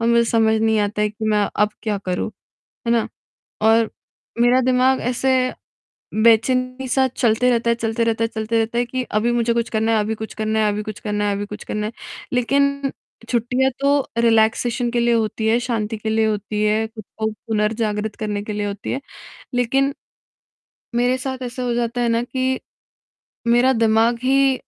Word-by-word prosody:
और 230 - 0
मुझे 235 0 +4
समझ 220 -1 +3
नहीं 220 -1 +2
आता 210 +1 -1
है 210 - +2
कि 220 +1 -7
मैं 210 -1 +2
अब 210 +1 +3
क्या 210 -3 -1
करूँ, 185 +1 -3 0.6
है - - +3
ना? 230 - +1 0.5
और 225 +1 +4 0.5
मेरा 245 +2 +5
दिमाग 255 +1 +3
ऐसे 255 +1 +1 0.7
बेचैनी-सा 255 +3 +3
चलते 240 0 +2
रहता 235 -1 +1
है - - +3
चलते 230 0 -1
रहता 230 0 +1
है - - 0
चलते 220 +1 -1
रहता 225 +1 0
है 245 - +2
कि 255 +1 -2 0.2
अभी 235 +3 +1
मुझे 235 -1 +1
कुछ 235 -1 0
करना 220 0 +1
है 220 - +3
अभी 215 +1 -1
कुछ 220 0 -7
करना 220 0 -1
है 215 -1 +3
अभी 210 +1 -3
कुछ 215 -1 -7
करना 210 -2 -2
है 200 - +1
अभी 205 +1 -4
कुछ 210 - -8
करना 210 0 -3
है। 220 - -5 0.4
लेक़िन 280 +2 +1 0.4
छुट्टियाँ 250 +2 +1
तो 280 +1 +3 0.3
रिलैक्सेशन 235 +2 +2
के 240 - 0
लिए 235 0 +3
होती 220 -1 -1
है, 230 - +4
शांति 225 -3 -2
के 220 +1 -3
लिए 220 0 +2
होती 210 0 -2
है, 215 +1 +2
ख़ुद 220 -1 -10 0.2
को 220 - 0
पुनर्जागृत 215 -1 -2
करने 210 -1 -3
के 210 +1 -5
लिए 205 0 -2
होती 200 -1 -4
है। 270 - -2 0.6
लेक़िन 270 +3 +2 1.0
मेरे 245 +2 +2
साथ 260 0 -4
ऐसा 250 +1 -5
हो 240 -1 0
जाता 240 0 -1
है 235 - +2
ना 230 0 +2
कि 260 +1 -1 0.9
मेरा 240 +3 +4
दिमाग 225 +2 +3
ही 270 +1 +4
230 Hz, 190 wpm, -21 LUFS, 215-250 Hz, 1.0 s, मेरा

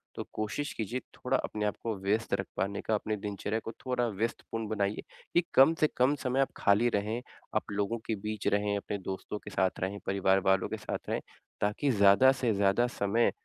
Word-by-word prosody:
तो - - -3
कोशिश 110 +7 -2
कीजिए 115 +3 -3 0.2
थोड़ा 130 +1 0
अपने 105 -1 -1
को 115 -2 -1
व्यस्त 105 +4 0
रख 95 0 -4
पाने 100 +1 -1
का 110 - 0
अपने 110 +1 -1
दिनचर्या 105 +1 -3
को 115 - -6
थोड़ा 125 -2 +1
व्यस्तपूर्ण 115 +1 -3
बनाइए, 105 -1 -1 0.3
कि 175 - +5
कम 135 +5 +7
से 155 - +6
कम 130 +4 +4
समय 130 0 +1
आप 135 - +1
खाली 105 +4 +4
रहें। 105 +4 -1 0.3
आप - - -1
लोगों 100 +3 -1
के 110 - -1
बीच 110 0 -3
रहें 100 0 +2
अपने 100 0 -3
दोस्तों 95 +2 -5
के 105 - -9
साथ 95 0 +1
रहें 95 +2 -2
परिवार 95 0 +3
वालों 95 -1 +3
के - - -3
साथ - - -5
रहें - - 0 0.4
ताकि 105 +7 +1
ज़्यादा 100 +4 +6
से 120 -4 +2
ज़्यादा 100 +4 +3
समय 105 +4 +2
105 Hz, 195 wpm, -30 LUFS, 100-120 Hz, 0.4 s, कम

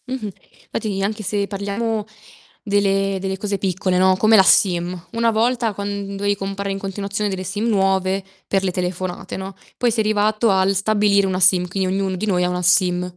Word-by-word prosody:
Mh-mh. 250 -5 -4 0.4
Fatti 205 -3 -3
anche 215 +2 -3
se 200 +1 -1
parliamo 205 +2 -3 0.6
delle 195 -1 +1
delle 190 0 -3
cose 200 0 -2
piccole, 185 -1 -1
no, 185 0 +4
come 215 +3 +4
la 195 - +7
SIM. 180 -2 +3
Una 230 0 +1
volta 230 0 0
quand 200 0 -5
dovevi 205 +1 0
comprare 195 0 -4
in 195 - -3
continuazione 200 +1 -3
delle 190 -1 -4
SIM 205 +4 -3
nuove 195 -2 +1 0.2
per 195 -1 0
le 190 - 0
telefonate, 180 0 -4
no. 190 0 -7 0.2
Poi 245 -1 +1
si 230 - -2
è - - +3
arrivato 215 +1 +1
al 190 0 +2
stabilire 200 0 +2
una 185 -1 -1
SIM, 185 -1 +5
quindi 190 +1 -2
ognuno 190 0 -1
di 185 - -3
noi 180 -4 +1
ha 180 - +1
una 180 0 -2
SIM. 180 0 +3
195 Hz, 190 wpm, -20 LUFS, 185-210 Hz, 0.6 s, la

